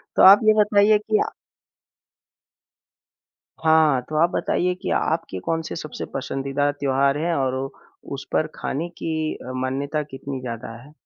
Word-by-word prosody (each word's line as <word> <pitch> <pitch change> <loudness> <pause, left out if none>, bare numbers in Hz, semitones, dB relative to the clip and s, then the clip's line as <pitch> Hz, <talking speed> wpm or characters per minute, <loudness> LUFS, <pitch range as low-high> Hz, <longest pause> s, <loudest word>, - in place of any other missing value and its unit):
तो - - +4
आप 195 +2 +10
ये 215 - +7
बताइए 210 +1 +4
कि 210 - 0
अ - - -4 2.3
हाँ, 160 -4 +4
तो 155 - -3
आप 170 - +4
बताइए 180 0 0
कि - - -2
आपके 160 - -2
कौन-से 165 - -3
सबसे 155 -3 -6
पसंदीदा 135 +1 -1
त्योहार 140 0 +1
हैं 170 +2 0
और 130 -3 0 0.6
उस 140 - -6
पर 155 - +2
खाने 165 +5 -3
की 160 -2 -3
अ, 130 - -8
मान्यता 135 +4 -2
कितनी 135 -1 -7
ज़्यादा 115 -1 -6
है? 145 +3 -16
150 Hz, 145 wpm, -23 LUFS, 135-165 Hz, 2.3 s, आप